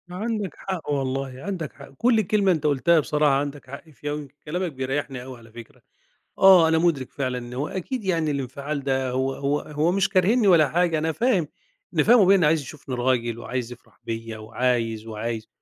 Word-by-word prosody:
عندك 210 -1 -3
حق 185 -5 -5
والله، 135 -1 -2
عندك 180 -7 -4
حق. - - -13
كل 230 -2 +3
كلمة 205 -3 +2
أنت 160 -3 -1
قُلتها 150 +3 +3
بصراحة 150 -1 +2
عندك 140 -1 -3
حق 140 +4 -10
فيها 145 0 -6
ويمكن 145 -2 -6
كلامك 180 +3 -2
بيريّحني 135 -1 -3
أوي 130 -1 -9
على 115 -1 -17
فكرة. 115 0 -13 0.6
آه، 185 -4 +7
أنا 160 0 +3
مُدرك 160 -7 0
فعلًا 130 -2 -2
إن 120 0 -8
هو 140 +4 -2
أكيد 215 +5 -4
يعني 165 -5 0
الانفعال 140 +1 -4
ده 130 -2 0
هو 130 +1 -1
هو 145 +1 -1
هو 155 +3 -1
مش 195 0 +2
كارهينّي 205 +4 +3
ولا 160 -5 +6
حاجة، 165 +1 +1
أنا 160 +1 0
فاهم 200 - +1 0.5
أنا - - +4
فاهم 240 0 +6
أبويا 195 0 +6
إن 180 - +2
عايز 155 +1 +3
يشوفني 135 -1 -8
راجل 120 -2 0
وعايز 125 0 -4
يفرح 110 -4 -16
بيّا 115 -1 -5
وعايز، 115 0 -1
وعايز، 110 0 -4
145 Hz, 190 wpm, -24 LUFS, 130-175 Hz, 0.6 s, آه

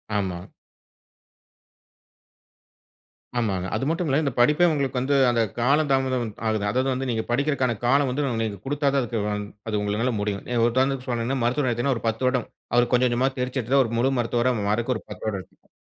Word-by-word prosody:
ஆமா. 90 -3 -2 2.9
ஆமாங்க. 95 -6 -1
அது 110 - -1
மட்டுமில்ல 160 -4 +1
இந்த 140 - 0
படிப்பே 150 +8 +5
உங்களுக்கு 140 -3 -1
வந்து 135 +3 +1
அந்த 120 -1 +2 0.2
கால 140 +6 +3
தாமதம் 130 -3 +1 0.2
ஆகுது. 110 -2 0
அதாவது 130 +5 +1
வந்து 130 0 -3
நீங்க 110 -2 -1
படிக்கறதுக்கான 130 -2 +1
காலம் 135 +2 +3
வந்து 140 +3 -1 0.2
நீங்க 105 -3 -4
குடுத்தா 145 0 +1
தான் 105 -5 -2 0.2
அது 105 -1 0
உங்களால 105 +5 0
முடியும். 100 -1 -2 0.2
உதாரணதுக்கு 130 +2 0
சொன்னேனா 120 +2 -1
மருத்துவர்னு 125 +2 +1
எடுத்தீங்கன்னா 120 +3 0
ஒரு 115 - -8
10 115 +3 -1
வருடம். 125 -2 0 0.3
அவர் 120 0 +3
கொஞ்சம் 125 +1 +4
கொஞ்சமா 125 +3 +1
தேர்ச்சி 125 +1 -1
எடுத்து 135 +4 +3
ஒரு 115 - -5
முழு 130 +3 +2
மருத்துவரா 120 +2 +1 0.2
மாறக்கு 120 +4 +1
ஒரு - - -11
10 - - -9
வருடம் 100 -3 -2
எடுத்துக்கும். 90 - -23
125 Hz, 165 wpm, -24 LUFS, 110-135 Hz, 2.9 s, படிப்பே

